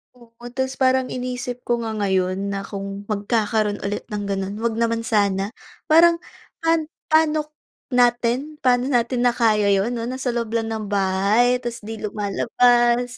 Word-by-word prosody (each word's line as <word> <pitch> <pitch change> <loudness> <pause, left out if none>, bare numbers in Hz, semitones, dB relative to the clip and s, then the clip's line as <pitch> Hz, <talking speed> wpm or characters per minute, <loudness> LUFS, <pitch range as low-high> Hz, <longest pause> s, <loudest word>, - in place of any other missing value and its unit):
Oo, 235 -1 -17
tapos 260 +1 -2
parang 260 -1 +2
inisip 250 0 -5
ko 240 -1 0
nga 225 - -3
ngayon 190 -2 0 0.2
na 195 - -3
kung 195 0 -6
magkakaroon 210 0 0
ulit 205 +1 -3
ng 205 -1 -2
gano'n, 195 0 -2
'wag 230 -1 -1
naman 230 0 0
sana. 200 -4 +1 0.4
Parang 335 +2 +6 0.4
pan 330 -1 +2 0.2
pa'no 315 -1 +3 0.5
natin, 245 +4 +1
pa'no 250 -1 +3
natin 240 +1 +1
na 245 - +4
kaya 215 -4 +3
yun 195 +3 +1
'no, 230 - -3
nasa 255 +1 -3
loob 235 -2 -2
lang 225 -1 0
ng 220 -1 -4
bahay, 200 +5 +2
tapos 240 -1 -6
'di 220 0 -6
lumalabas 240 +4 +2
235 Hz, 155 wpm, -22 LUFS, 205-250 Hz, 0.5 s, Parang